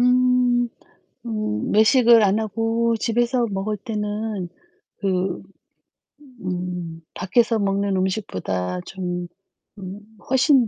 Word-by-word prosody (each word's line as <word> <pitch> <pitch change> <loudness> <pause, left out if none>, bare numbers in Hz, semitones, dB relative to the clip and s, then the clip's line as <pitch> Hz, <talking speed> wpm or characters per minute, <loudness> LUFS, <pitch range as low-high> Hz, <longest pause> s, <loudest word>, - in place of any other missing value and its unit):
음. 250 -1 +3 0.6
음 215 - -2
외식을 230 +1 +6
안 200 +1 +3
하고 225 +2 0
집에서 240 +2 +1
먹을 200 +2 -2
때는 210 -2 -3 0.5
그 185 -2 -1 1.0
음 180 -2 -4
밖에서 225 +4 +2
먹는 200 0 +1
음식보다 95 - -2
좀 180 -2 -4 0.5
음 190 +1 -7 0.3
훨씬 265 -1 +4
210 Hz, 170 characters per minute, -23 LUFS, 185-235 Hz, 1.0 s, 외식을